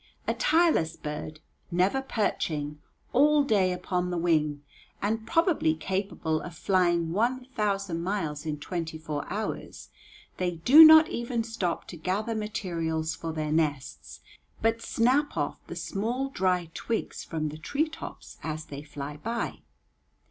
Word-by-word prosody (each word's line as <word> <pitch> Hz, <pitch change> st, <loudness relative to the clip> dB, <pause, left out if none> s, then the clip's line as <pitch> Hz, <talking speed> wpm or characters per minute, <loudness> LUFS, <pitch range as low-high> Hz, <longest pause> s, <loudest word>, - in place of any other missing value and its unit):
A -, -, +1 dB
tireless 310 Hz, -, +2 dB
bird, 150 Hz, +1 st, -6 dB, 0.3 s
never 185 Hz, +9 st, +2 dB
perching, 150 Hz, -, -2 dB, 0.3 s
all 295 Hz, +3 st, +5 dB
day 200 Hz, -8 st, +2 dB
upon 180 Hz, 0 st, -2 dB
the 175 Hz, -, -2 dB
wing, 155 Hz, -4 st, +1 dB, 0.4 s
and 220 Hz, +2 st, -1 dB
probably 330 Hz, -, +2 dB
capable 170 Hz, -2 st, -2 dB
of 175 Hz, -2 st, -8 dB
flying 175 Hz, -2 st, +2 dB
one 245 Hz, +7 st, 0 dB
thousand 200 Hz, -8 st, -1 dB
miles 170 Hz, -6 st, -2 dB
in 155 Hz, -2 st, -3 dB
twenty 165 Hz, 0 st, -4 dB
four 155 Hz, -2 st, -5 dB
hours, 215 Hz, +2 st, -5 dB, 0.5 s
they 180 Hz, -1 st, -1 dB
do 260 Hz, -, +9 dB
not 315 Hz, 0 st, +9 dB
even 235 Hz, -1 st, -2 dB
stop 225 Hz, -7 st, -2 dB
to 175 Hz, -, -8 dB
gather 195 Hz, +7 st, -1 dB
materials 165 Hz, -7 st, -2 dB
for 165 Hz, 0 st, -5 dB
their 155 Hz, -1 st, -3 dB
nests, 145 Hz, -, -2 dB, 0.4 s
but 225 Hz, +1 st, +1 dB
snap 260 Hz, +7 st, +1 dB
off -, -, -1 dB
the -, -, -6 dB
small 240 Hz, +7 st, -2 dB
dry 180 Hz, -7 st, 0 dB
twigs 230 Hz, -2 st, -3 dB
from 155 Hz, -2 st, -3 dB
the 150 Hz, -, -8 dB
tree 285 Hz, -, 0 dB
tops 320 Hz, -, -9 dB
as 155 Hz, 0 st, -4 dB
they 140 Hz, 0 st, -7 dB
fly 145 Hz, 0 st, -7 dB
by. 230 Hz, +8 st, -3 dB
180 Hz, 140 wpm, -28 LUFS, 160-230 Hz, 0.5 s, do